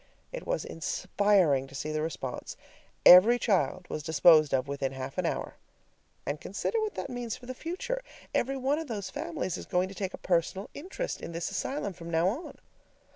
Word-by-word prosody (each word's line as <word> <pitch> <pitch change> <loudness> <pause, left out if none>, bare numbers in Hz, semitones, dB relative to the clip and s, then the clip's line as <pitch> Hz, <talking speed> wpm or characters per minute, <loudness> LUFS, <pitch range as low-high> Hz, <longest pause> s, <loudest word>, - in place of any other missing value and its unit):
It - - -6
was - - -1
inspiring 180 -4 +2
to 135 - -13
see 155 +2 -3
the 155 0 -1
response. 145 -5 -5 0.5
Every 205 +7 +10
child 195 -5 +1
was 155 - -4
disposed 155 0 +5
of 135 0 +1
within 140 -1 -2
half 135 0 -5
an - - +1
hour. - - -3 0.7
And 145 +2 -3
consider 440 - -2
what 430 -1 -2
that - - -4
means 245 -3 -4
for 245 - -14
the 255 - -5
future: 435 - -4 0.3
every 270 +2 0
one 270 +3 +1
of 325 - -5
those 205 -5 -4
families 300 - -3
is - - -9
going 180 +1 +1
to - - -8
take 195 -2 -4
a - - -14
personal 180 +3 -1
interest 385 +11 -5
in 170 - -6
this 170 +1 -3
asylum 265 -8 -2
from 170 -1 -9
now 170 +2 +3
on. 275 - -6
190 Hz, 190 wpm, -29 LUFS, 160-270 Hz, 0.7 s, Every